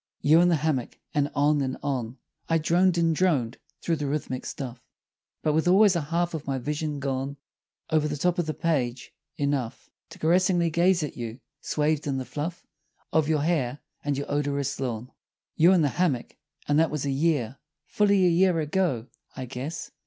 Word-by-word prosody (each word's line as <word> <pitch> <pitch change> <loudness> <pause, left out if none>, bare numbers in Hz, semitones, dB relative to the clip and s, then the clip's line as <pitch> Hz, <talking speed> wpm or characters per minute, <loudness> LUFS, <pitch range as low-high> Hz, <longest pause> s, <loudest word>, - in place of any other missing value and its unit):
You 155 +4 +6
in 175 - +4
the 170 - +4
hammock; 145 -5 -1 0.2
and 145 -1 +1
on 145 +1 +3
and 130 -1 -2
on 130 -3 -2 0.3
I 165 - +4
droned 175 +3 +2
and 165 -1 +2
droned 140 -10 +1 0.2
through 165 -1 0
the 145 -1 -3
rhythmic 135 -3 -3
stuff 125 -2 -6 0.6
But 155 - +2
with 160 +3 +1
always 195 +1 +6
a 170 - +1
half 170 +3 -1
of 155 -3 -5
my 135 -1 0
vision 150 +2 -3
gone 135 +1 -3 0.5
Over 155 -1 +3
the 150 0 -3
top 180 +4 +1
of 170 - 0
the 155 - -1
page 130 -7 -1 0.2
enough 140 -5 -2 0.2
To - - -12
caressingly 175 0 +2
gaze 175 +1 +3
at 150 - -5
you, 115 +1 -6 0.2
swathed 150 0 0
in 135 -2 0
the 130 - -3
fluff 160 +6 -5 0.5
Of 160 -1 +2
your 155 -2 +2
hair 145 -6 0 0.3
and 145 -1 -1
your 140 - -3
odorous 140 -2 -1
lawn. 125 -1 -4 0.4
You 170 +3 +6
in 180 -4 +4
the 145 - +3
hammock 140 -5 -1 0.3
And 145 +1 +3
that 165 -1 +3
was 150 -2 -3
a 140 - 0
year 140 -4 0 0.3
Fully 200 +1 +3
a - - +5
year 175 0 +3
ago, 150 -6 0 0.3
I 130 - -5
guess! 135 +6 -6
150 Hz, 190 wpm, -26 LUFS, 135-170 Hz, 0.6 s, You